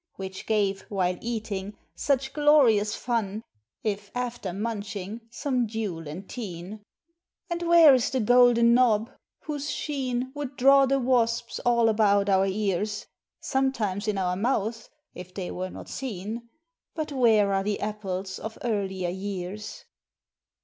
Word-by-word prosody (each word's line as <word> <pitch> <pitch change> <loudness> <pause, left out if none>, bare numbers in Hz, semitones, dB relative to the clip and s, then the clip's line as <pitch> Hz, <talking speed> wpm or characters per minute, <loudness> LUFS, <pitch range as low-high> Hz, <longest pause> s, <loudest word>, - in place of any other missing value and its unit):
(Which 190 0 -7
gave, 200 -3 +1
while 185 -3 0
eating, 210 -4 -4 0.2
such 270 -1 0
glorious 270 -9 +4
fun, 220 -3 -2 0.4
If 205 -1 -2
after 240 -6 -3
munching 210 +1 -4
some 250 -1 -1
dule 205 -8 -4
and 180 +6 -7
teen)? 200 -2 -7 0.7
And 340 0 -2
where 335 -4 +7
is 255 -2 +2
the 260 - -1
Golden 240 0 +5
Knob, 235 -2 +3 0.3
whose 295 -1 -4
sheen 260 -4 -2
Would 285 -2 -6
draw 275 +1 +6
the 275 +1 +2
wasps 235 -2 +1
all 235 -1 +3
about 205 -2 +3
our 190 0 +4
ears? 210 +1 -1 0.4
(Sometimes 225 -7 -1
in 210 -2 0
our 180 -1 0
mouths, 225 +1 -1 0.2
if 180 +1 -10
they 185 -3 -4
were 185 +1 -4
not - - -10
seen) 230 -1 -5 0.5
But 310 -2 -3
where 220 -7 +4
are 195 0 +1
the 205 0 -1
apples 195 -3 -4
of 220 0 -7
earlier 190 -6 -1
years? 195 +2 -6
215 Hz, 135 wpm, -26 LUFS, 195-245 Hz, 0.7 s, where